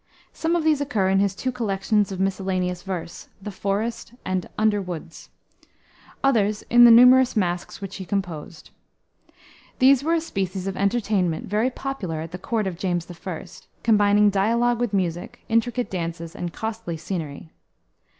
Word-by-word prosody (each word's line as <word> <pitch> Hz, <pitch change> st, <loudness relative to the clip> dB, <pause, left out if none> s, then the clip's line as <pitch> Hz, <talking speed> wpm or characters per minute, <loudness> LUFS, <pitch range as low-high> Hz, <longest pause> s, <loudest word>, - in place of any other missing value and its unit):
Some 325 Hz, +1 st, 0 dB
of 340 Hz, -, 0 dB
these 310 Hz, -2 st, +2 dB
occur 220 Hz, -10 st, 0 dB
in 195 Hz, 0 st, +3 dB
his 200 Hz, -1 st, +1 dB
two 255 Hz, +5 st, -2 dB
collections 210 Hz, -3 st, 0 dB
of 190 Hz, -, -5 dB
miscellaneous 185 Hz, -2 st, -1 dB
verse, 180 Hz, -3 st, -6 dB
the 205 Hz, +2 st, -7 dB
Forest 205 Hz, +5 st, -3 dB
and 185 Hz, -2 st, -2 dB
Underwoods; 185 Hz, -6 st, -2 dB, 0.9 s
others 215 Hz, -6 st, +2 dB
in 240 Hz, 0 st, +8 dB
the -, -, +9 dB
numerous 250 Hz, +2 st, +7 dB
masques 175 Hz, -1 st, -2 dB
which 195 Hz, -1 st, -6 dB
he 190 Hz, -, -6 dB
composed. 175 Hz, -3 st, -5 dB, 1.1 s
These 270 Hz, +1 st, +5 dB
were 330 Hz, +2 st, +2 dB
a -, -, +2 dB
species 190 Hz, -, -3 dB
of 195 Hz, -1 st, -3 dB
entertainment, 200 Hz, -4 st, 0 dB
very 215 Hz, +5 st, +1 dB
popular 245 Hz, -, -4 dB
at 165 Hz, 0 st, -7 dB
the 180 Hz, -, -7 dB
court 220 Hz, +2 st, -1 dB
of 180 Hz, -3 st, -4 dB
James 175 Hz, -3 st, -1 dB, 0.2 s
I., 175 Hz, -2 st, -4 dB, 0.4 s
combining 205 Hz, -2 st, +4 dB
dialogue 235 Hz, +4 st, +2 dB
with 240 Hz, -3 st, 0 dB
music, 185 Hz, +4 st, -3 dB
intricate 240 Hz, +2 st, 0 dB
dances, 170 Hz, -2 st, -4 dB
and 175 Hz, -1 st, -4 dB
costly 220 Hz, -4 st, -5 dB
scenery. 160 Hz, -3 st, -6 dB
200 Hz, 150 wpm, -23 LUFS, 180-235 Hz, 1.1 s, the